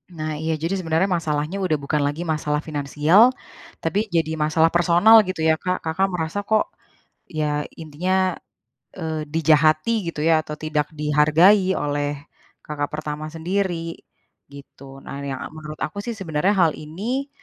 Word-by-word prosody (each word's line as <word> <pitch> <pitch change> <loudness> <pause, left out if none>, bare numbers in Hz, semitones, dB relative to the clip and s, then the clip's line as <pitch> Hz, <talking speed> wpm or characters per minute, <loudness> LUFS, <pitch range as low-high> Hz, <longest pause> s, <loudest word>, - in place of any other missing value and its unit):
Nah 155 -1 -3
iya, 160 0 -1
jadi 170 +4 0
sebenarnya 165 +2 +1
masalahnya 155 +3 -2
udah 170 -4 +1
bukan 150 +1 0
lagi 145 +4 -3
masalah 150 -2 -1
finansial, 155 - +3 0.5
tapi 205 +7 0
jadi 160 -1 +1
masalah 160 +2 +3
personal, 175 +5 +5
gitu 185 -3 -3
ya, 160 0 +3
Kak? 180 0 -2
Kakak 180 +4 0
merasa, 175 0 -3
kok, 215 -1 +1 0.6
ya 150 -2 -1 0.2
intinya, 180 +4 0 0.6
eee, 160 -2 -3
dijahati, 155 +3 +3 0.2
gitu 150 -2 -3
ya? 160 -1 +4
Atau, 150 -1 -8
tidak 150 -1 -2
dihargai 160 +6 +4
oleh 145 0 -2 0.5
kakak 145 -1 -3
pertama 155 0 -5
sendiri, 165 0 -3 0.5
gitu. 140 -1 -13
Nah, 140 0 -7
yang 135 -2 -4
menurut 155 -1 -8
aku 200 +6 -6
sih, 235 -2 -4
sebenarnya 180 0 0
hal 170 -4 +4
ini, 225 - -4
160 Hz, 145 wpm, -22 LUFS, 150-180 Hz, 0.6 s, personal